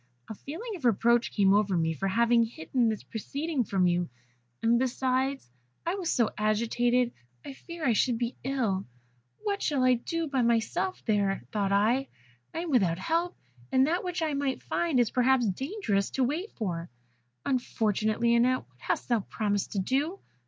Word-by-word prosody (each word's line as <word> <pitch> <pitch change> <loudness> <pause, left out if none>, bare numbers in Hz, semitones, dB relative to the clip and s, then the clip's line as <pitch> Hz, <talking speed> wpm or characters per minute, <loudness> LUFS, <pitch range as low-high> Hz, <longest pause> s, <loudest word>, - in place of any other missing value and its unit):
A - - -6
feeling 365 - -7
of 335 - -10
reproach 235 +1 +3
came 195 -2 +4
over 200 -3 +2
me 165 -1 +1
for 160 +6 -2
having 235 +4 +4
hidden 230 +3 0
this 215 -2 -3
proceeding 280 +5 -3
from 190 -3 +1
you; 175 0 +1 0.5
and 235 +1 +4
besides, 260 - 0 0.4
I 340 - 0
was 370 -4 -2
so 235 -4 +2
agitated, 235 +3 +2 0.3
I 275 - -6
feared 335 +2 -5
I 240 - +4
should 240 +2 +2
be 240 +1 -2
ill. 235 - -1 0.6
'What 405 -2 -1
shall 280 -4 +1
I 255 0 +5
do 330 +7 -2
by 270 -3 0
myself 235 +10 0
here?' 200 - +1
thought 200 -2 0
I; 230 +7 +2 0.4
'I - - -4
am 345 - -4
without 190 -10 +3
help, 335 - -1 0.3
and 260 0 +5
that 340 +5 0
which 360 -2 -2
I 310 -2 0
might 280 -1 -1
find 330 -7 0
is 240 -3 +2
perhaps 255 -1 +3
dangerous 210 - -1
to 265 - +3
wait 315 - -2
for. 175 -6 -4 0.6
Unfortunate 220 -4 0
Lionette, 235 +2 +3
what 130 0 -32
hast - - -2
thou 235 -2 +2
promised 205 0 -2
to 200 - 0
do? 280 - 0
240 Hz, 175 wpm, -28 LUFS, 210-275 Hz, 0.6 s, I